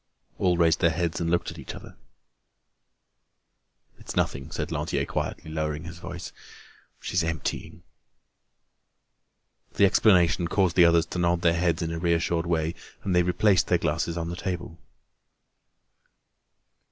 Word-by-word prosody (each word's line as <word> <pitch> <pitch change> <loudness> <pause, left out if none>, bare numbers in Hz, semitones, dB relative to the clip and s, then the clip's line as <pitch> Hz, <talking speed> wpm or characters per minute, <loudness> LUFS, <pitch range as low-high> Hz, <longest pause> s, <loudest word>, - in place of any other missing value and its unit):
All 90 -2 +2
raised 85 -2 +3
their 85 - +4
heads 85 0 -2
and 85 - 0
looked 85 0 0
at - - -11
each - - -8
other. - - -12 2.0
"It's - - -8
nothing," 70 +3 -1
said - - -4
Lantier - - -1
quietly, 80 - -4
lowering 80 0 -2
his 85 +1 -9
voice. 85 0 -7 0.7
"She's 90 -2 -1
emptying." 85 0 -4 1.9
The 100 - +4
explanation 90 -3 +4
caused 95 -1 +1
the 90 - +7
others 85 0 +4
to 90 - -5
nod 85 0 +1
their 85 -1 +3
heads 85 -1 0
in 80 - -3
a 80 - -3
reassured 85 0 0
way, 80 -1 0 0.3
and 95 -2 0
they 90 - +5
replaced 90 +1 +2
their - - +3
glasses 85 0 -1
on 85 0 -3
the - - -4
table. 90 -2 -5
85 Hz, 140 wpm, -26 LUFS, 80-90 Hz, 2.0 s, the